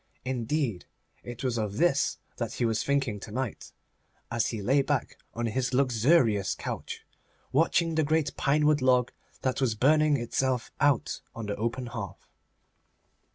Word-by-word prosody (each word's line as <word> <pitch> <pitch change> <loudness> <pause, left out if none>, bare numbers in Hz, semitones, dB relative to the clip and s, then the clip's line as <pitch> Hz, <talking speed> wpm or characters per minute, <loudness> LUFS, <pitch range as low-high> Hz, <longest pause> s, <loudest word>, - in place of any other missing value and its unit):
Indeed, 125 - -1 0.4
it 120 0 -7
was 125 -3 0
of 105 -2 -3
this 150 -4 +2 0.2
that 115 -2 -3
he 120 - 0
was 110 -2 0
thinking 135 -7 0
to 105 - -9
night, 125 +1 -4 0.6
as 115 -1 +1
he 115 - -3
lay 130 +8 +3
back - - -1 0.2
on 120 +1 -1
his 125 +3 -1
luxurious 125 - +3
couch, - - -6 0.5
watching 165 +3 +2
the 160 0 +2
great 155 -1 +1
pinewood 150 +1 +3
log 125 -1 +3 0.3
that 130 +1 0
was 120 -4 +2
burning 150 +5 +4
itself 125 0 -1
out 140 -4 +2
on 115 - -5
the 105 0 -2
open 115 +3 -2
hearth. 115 -5 -7
125 Hz, 150 wpm, -28 LUFS, 115-140 Hz, 0.6 s, burning